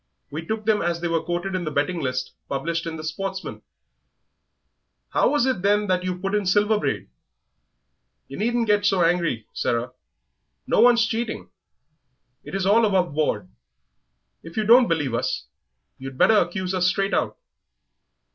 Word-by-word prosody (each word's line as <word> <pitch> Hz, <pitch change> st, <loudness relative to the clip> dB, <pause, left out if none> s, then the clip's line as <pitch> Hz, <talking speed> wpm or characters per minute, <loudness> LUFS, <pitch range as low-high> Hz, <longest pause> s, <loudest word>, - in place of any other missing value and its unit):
We 155 Hz, +3 st, -5 dB
took 215 Hz, +5 st, -4 dB
them 215 Hz, -1 st, +2 dB
as 170 Hz, 0 st, -1 dB
they 170 Hz, -, -2 dB
were 165 Hz, -1 st, 0 dB
quoted 175 Hz, +3 st, -3 dB
in 185 Hz, -1 st, -1 dB
the 155 Hz, -, -2 dB
betting 150 Hz, +4 st, -1 dB
list 130 Hz, -1 st, -2 dB, 0.2 s
published 165 Hz, +5 st, -2 dB
in 165 Hz, -, -4 dB
the 155 Hz, -, -7 dB
Sportsman." 190 Hz, +5 st, -5 dB, 1.5 s
"How -, -, +2 dB
was 290 Hz, -4 st, +2 dB
it, 260 Hz, -8 st, 0 dB
then, 205 Hz, +2 st, +2 dB
that 185 Hz, -2 st, 0 dB
you 185 Hz, -1 st, -2 dB
put 195 Hz, +2 st, -3 dB
in 205 Hz, -2 st, 0 dB
Silver 210 Hz, +3 st, +3 dB
Braid?" -, -, -2 dB, 1.2 s
"Yer -, -, -8 dB
needn't 235 Hz, +2 st, +1 dB
get 205 Hz, -1 st, +2 dB
so 195 Hz, -3 st, +3 dB
angry, 165 Hz, -10 st, +1 dB
Sarah, 120 Hz, +1 st, -1 dB, 0.7 s
no -, -, +1 dB
one's 240 Hz, -1 st, +6 dB
cheating; 230 Hz, -1 st, -4 dB, 0.9 s
it -, -, -7 dB
is 195 Hz, -1 st, -1 dB
all 215 Hz, +4 st, +4 dB
above 185 Hz, -6 st, +2 dB
board. 110 Hz, -11 st, -1 dB, 0.9 s
If 165 Hz, +3 st, -12 dB
you 215 Hz, -, +2 dB
don't 240 Hz, +3 st, +6 dB
believe 150 Hz, -7 st, -1 dB
us, 115 Hz, -, -2 dB, 0.5 s
you'd 135 Hz, 0 st, -8 dB
better 220 Hz, -, +5 dB
accuse 190 Hz, -3 st, 0 dB
us 180 Hz, -1 st, +2 dB
straight 195 Hz, +2 st, 0 dB
out." -, -, 0 dB
185 Hz, 165 wpm, -23 LUFS, 165-210 Hz, 1.5 s, one's